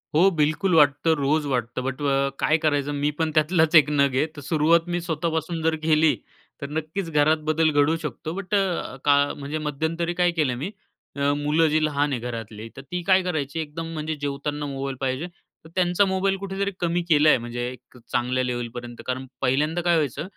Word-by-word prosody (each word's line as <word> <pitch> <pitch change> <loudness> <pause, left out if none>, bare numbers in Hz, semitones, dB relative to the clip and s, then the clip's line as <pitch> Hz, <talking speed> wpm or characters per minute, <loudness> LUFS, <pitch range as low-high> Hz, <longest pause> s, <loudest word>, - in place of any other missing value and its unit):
हो 180 +5 +6
बिलकुल 160 +4 +1
वाटतं, 145 +1 +4
रोज 145 +2 +1
वाटतं. 125 -2 -2
बट 135 +2 -4
अ, 140 -1 +1
काय 155 - +3
करायचं 145 -1 +1
मी 145 - +1
पण 160 -1 +1
त्यातलाच 160 +1 +3
एक 150 -2 +7
नग 140 -2 +2
आहे. 135 - +3
तर 145 - -8
सुरुवात 160 +4 +2
मी 175 - -1
स्वतःपासून 160 +1 -2
जर 160 0 +2
केली. 155 -1 +4 0.5
तर 140 - -5
नक्कीच 165 +3 -4
घरात 150 +1 +3
बदल 160 0 +3
घडवू 145 +2 +3
शकतो. 155 +2 -5
बट 195 +2 -6
अ, 190 -8 -1
का 145 -1 +5 0.2
म्हणजे 145 +2 -4
मध्यंतरी 165 +4 -2
काय 175 0 +4
केलं 130 -5 +2
मी 150 +10 -4 0.4
अ, 140 0 +1
मुलं 150 +3 +2
जी 155 +1 +2
लहान 145 -1 0
आहे 130 - -1
घरातली, 115 -2 -6
तर 135 - -8
ती 180 0 -2
काय 190 +1 +4
करायची 160 -3 -2
एकदम 160 +1 -5
म्हणजे 155 0 -3
जेवताना 145 +1 -3
मोबाईल 135 -1 -4
पाहिजे. 135 +6 -1 0.4
तर - - -12
त्यांचा 180 +2 +3
मोबाईल 190 +1 +1
कुठेतरी 195 +1 -3
कमी 175 0 0
केला 155 -1 +5
आहे, - - +6
म्हणजे 120 0 -5
एक 125 0 -15
चांगल्या 125 +1 0
लेवलपर्यंत. 120 -1 -5
कारण 130 +1 -3 0.2
पहिल्यांदा 150 +7 +1
काय 175 0 +3
व्हायचं 150 -3 -1
150 Hz, 190 wpm, -24 LUFS, 140-165 Hz, 0.5 s, एक